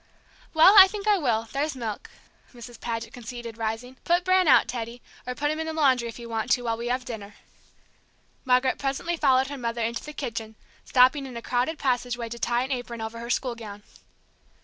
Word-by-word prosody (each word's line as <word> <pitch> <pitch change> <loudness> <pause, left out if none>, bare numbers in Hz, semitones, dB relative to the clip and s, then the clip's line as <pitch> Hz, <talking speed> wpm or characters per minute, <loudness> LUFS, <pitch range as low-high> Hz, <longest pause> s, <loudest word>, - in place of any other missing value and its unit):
"Well, 325 +5 +8
I 380 - +11
think 415 +1 -6
I 415 -2 +4
will, 230 -6 0
there's 290 +1 -2
milk," 225 -5 -5 0.5
Mrs. 240 -1 -11
Paget 230 -1 -4
conceded, 235 -1 -8
rising. 225 +3 -4
"Put 350 +1 +2
Bran 370 -1 +4
out, 265 - +6
Teddy; 235 0 -5 0.3
or 250 - -3
put 295 +2 0
him 310 - -3
in 320 - -3
the 320 - -3
laundry 260 -6 +2
if 230 - -8
you 235 -1 -9
want 225 +1 -3
to, 245 - 0
while 230 -1 0
we 235 +1 -5
have 250 +1 -1
dinner." 210 -4 -8 1.1
Margaret 255 0 +2
presently 280 +6 -2
followed 265 -4 +3
her 285 -1 -6
mother 235 -1 -2
into 230 +1 -2
the 300 - -7
kitchen, 225 -6 -5 0.3
stopping 260 +2 +4
in 250 -2 -8
a - - -6
crowded 255 +6 -1
passageway 245 -3 -1
to 235 +1 -7
tie 240 +1 +1
an 265 - -5
apron 245 -2 -4
over 220 +1 -5
her 235 0 -7
school 250 0 0
gown. 210 -3 -10
245 Hz, 205 wpm, -26 LUFS, 230-275 Hz, 1.1 s, I